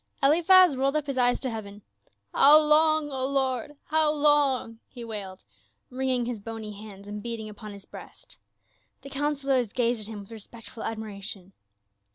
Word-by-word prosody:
Eliphaz 345 Hz, +3 st, +5 dB
rolled 270 Hz, +2 st, 0 dB
up 305 Hz, -2 st, 0 dB
his 275 Hz, -2 st, -3 dB
eyes 245 Hz, 0 st, +2 dB
to 260 Hz, -, -2 dB
heaven. 205 Hz, -2 st, -8 dB, 0.2 s
" 100 Hz, 0 st, -40 dB
How 295 Hz, +2 st, +8 dB
long, 310 Hz, 0 st, +4 dB
O 260 Hz, -1 st, -4 dB
Lord, 265 Hz, 0 st, -2 dB
how 310 Hz, -1 st, +3 dB
long 285 Hz, -6 st, +2 dB
!" -, -, -52 dB
he 240 Hz, -, -7 dB
wailed, 200 Hz, -4 st, -8 dB, 0.5 s
wringing 255 Hz, -1 st, -1 dB
his 240 Hz, -2 st, -4 dB
bony 225 Hz, 0 st, -7 dB
hands 200 Hz, -1 st, -12 dB
and 210 Hz, 0 st, -7 dB
beating 230 Hz, -1 st, -6 dB
upon 210 Hz, 0 st, -10 dB
his 200 Hz, -1 st, -12 dB
breast. -, -, -13 dB, 0.6 s
The 275 Hz, -, -11 dB
councilors 275 Hz, -5 st, -1 dB
gazed 240 Hz, -2 st, 0 dB
at 210 Hz, -, -9 dB
him 215 Hz, -2 st, -8 dB
with 200 Hz, -, -15 dB
respectful 225 Hz, +1 st, -11 dB
admi 225 Hz, 0 st, -4 dB
ration. 200 Hz, -2 st, -9 dB
245 Hz, 175 wpm, -26 LUFS, 215-280 Hz, 0.6 s, How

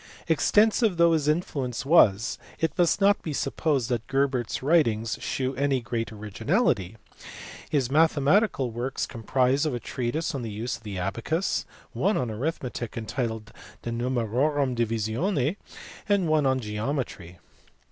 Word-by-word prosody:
Extensive 210 Hz, -, +3 dB
though 170 Hz, 0 st, +5 dB
his 150 Hz, -3 st, +1 dB
influence 140 Hz, -6 st, -1 dB
was, 120 Hz, -, +4 dB, 0.2 s
it 160 Hz, -3 st, -1 dB
must 175 Hz, +1 st, +2 dB
not 200 Hz, 0 st, +4 dB
be 155 Hz, -, -4 dB
supposed 135 Hz, -2 st, 0 dB
that 120 Hz, -2 st, -2 dB
Gerbert 135 Hz, -3 st, 0 dB
s -, -, -4 dB
writings 115 Hz, -8 st, +2 dB
shew 130 Hz, 0 st, -2 dB
any 135 Hz, 0 st, +1 dB
great 115 Hz, -1 st, -3 dB
originality. 110 Hz, -, -1 dB, 0.7 s
His 135 Hz, -5 st, +1 dB
mathe 160 Hz, +4 st, +4 dB
matical 145 Hz, -, +2 dB
works 120 Hz, +4 st, -3 dB
comprise 130 Hz, +4 st, +1 dB
a 125 Hz, -5 st, -2 dB
treatise 130 Hz, +8 st, -3 dB
on 135 Hz, -, -3 dB
the 115 Hz, -, -4 dB
use 110 Hz, +4 st, -3 dB
of -, -, -22 dB
the 105 Hz, -3 st, -6 dB
abacus, 115 Hz, -, -1 dB, 0.2 s
one 200 Hz, +3 st, +1 dB
on 125 Hz, -3 st, -1 dB
arithmetic 125 Hz, -1 st, -4 dB
entitled 110 Hz, -1 st, -4 dB, 0.3 s
De 120 Hz, -, -3 dB
Numerorum 125 Hz, +3 st, 0 dB
Divisione, 120 Hz, -, 0 dB, 0.5 s
and 200 Hz, -4 st, +3 dB
one 155 Hz, -3 st, +3 dB
on 130 Hz, 0 st, +2 dB
geometry. 105 Hz, -, -4 dB
130 Hz, 140 wpm, -26 LUFS, 115-155 Hz, 0.7 s, though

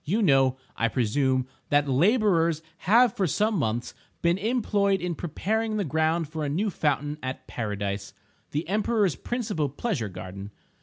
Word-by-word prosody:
You 205 Hz, +9 st, +1 dB
know, 135 Hz, -6 st, +4 dB, 0.2 s
I 115 Hz, -, +1 dB
presume, 130 Hz, +3 st, +1 dB, 0.2 s
that 145 Hz, 0 st, +3 dB
laborers 170 Hz, -, +3 dB, 0.3 s
have 235 Hz, 0 st, +6 dB
for 190 Hz, -, +1 dB
some 210 Hz, -, +1 dB
months 120 Hz, -2 st, -1 dB, 0.3 s
been 170 Hz, +2 st, +3 dB
employed 205 Hz, -3 st, +1 dB
in 180 Hz, 0 st, -2 dB
preparing 215 Hz, +8 st, -2 dB
the 205 Hz, -, 0 dB
ground 160 Hz, +2 st, +1 dB
for 155 Hz, +1 st, -4 dB
a 145 Hz, -, -1 dB
new 195 Hz, +8 st, 0 dB
fountain 145 Hz, -1 st, -1 dB
at 130 Hz, 0 st, -5 dB
Paradise, 100 Hz, -3 st, -3 dB, 0.4 s
the 150 Hz, +3 st, -3 dB
Emperor's 210 Hz, -1 st, +1 dB
principal 215 Hz, -, -2 dB
pleasure 140 Hz, -, -2 dB
garden. 95 Hz, +2 st, -8 dB
160 Hz, 150 wpm, -26 LUFS, 130-205 Hz, 0.4 s, have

